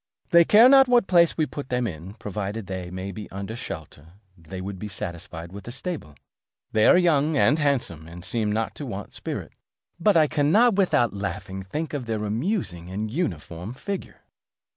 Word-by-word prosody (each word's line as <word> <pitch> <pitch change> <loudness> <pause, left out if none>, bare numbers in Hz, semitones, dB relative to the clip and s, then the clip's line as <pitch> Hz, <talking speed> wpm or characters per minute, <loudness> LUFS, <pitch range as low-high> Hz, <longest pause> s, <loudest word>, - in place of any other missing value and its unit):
They 170 -1 +8
care 220 +7 +8
not 270 0 +7
what 245 -3 +4
place 170 -3 +4
we 155 - +2
put 145 -3 -7
them 125 -1 0
in, 90 0 -6
provided 105 0 -4
they 95 -2 -5
may 95 +2 -5
be 105 +2 -8
under 100 +3 -6
shelter; 80 - -8 0.2
they 85 +2 -9
would 95 0 -6
be 105 - -5
satisfied 85 -3 -6
with 100 +2 -10
a - - -5
stable. 140 - -5 0.6
They 110 0 +4
are - - +7
young 155 -4 +3
and 145 +4 +4
handsome, 120 - -1
and 85 +2 -10
seem 105 +1 -1
not 110 +1 -1
to 145 - -5
want 100 -4 -6
spirit. - - -5 0.5
But 200 +1 +4
I 155 - +6
cannot 165 +12 +4
without 185 - +2
laughing 95 -1 -4
think 150 +14 -4
of 135 -5 -4
their 110 -2 -2
amusing 105 - -2
and 105 +3 -3
uniform 95 - -4
figure." 200 +7 -6
110 Hz, 185 wpm, -25 LUFS, 95-155 Hz, 0.6 s, They